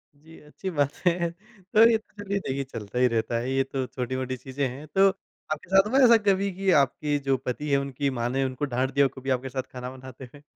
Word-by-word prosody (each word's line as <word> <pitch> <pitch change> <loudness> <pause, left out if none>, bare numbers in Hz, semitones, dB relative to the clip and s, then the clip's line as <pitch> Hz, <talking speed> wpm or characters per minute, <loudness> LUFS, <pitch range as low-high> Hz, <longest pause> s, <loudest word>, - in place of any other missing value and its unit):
जी, 160 +3 -16
अच्छी 150 +6 -7
बातें 145 +3 +1
है 170 - 0
तो 210 +3 +2
ये 225 - +4
तो 210 -1 -13
चलिए 200 0 -1
देखिए 140 -6 -3
चलता 120 -3 -6
ही 125 - +5
रहता 115 0 -1
है, 120 +3 -2
ये 135 0 +2
तो 135 0 -3
छोटी-मोटी 130 0 -3
चीज़ें 130 +2 -3
हैं। 135 +5 -8
तो 195 +5 +4 0.4
आपके 155 +2 -4
साथ 195 +2 +5
हुआ 265 - +4
ऐसा 235 -1 +7
कभी 195 0 +2
कि 195 +1 -1
आपके 145 +2 -1
जो 135 -1 +3
पति 145 +4 -3
हैं 140 - +5
उनकी 140 0 -2
माँ 120 - 0
ने 135 +2 0
उनको 130 +2 -2
डाँट 130 +2 +1
दिया 140 0 +4
हो - - +1
कभी 135 - -6
आपके 130 0 0
साथ 130 0 -3
खाना 125 0 -6
बनाते 130 0 -11
हुए? 140 +4 -16
140 Hz, 240 wpm, -26 LUFS, 130-180 Hz, 0.4 s, ऐसा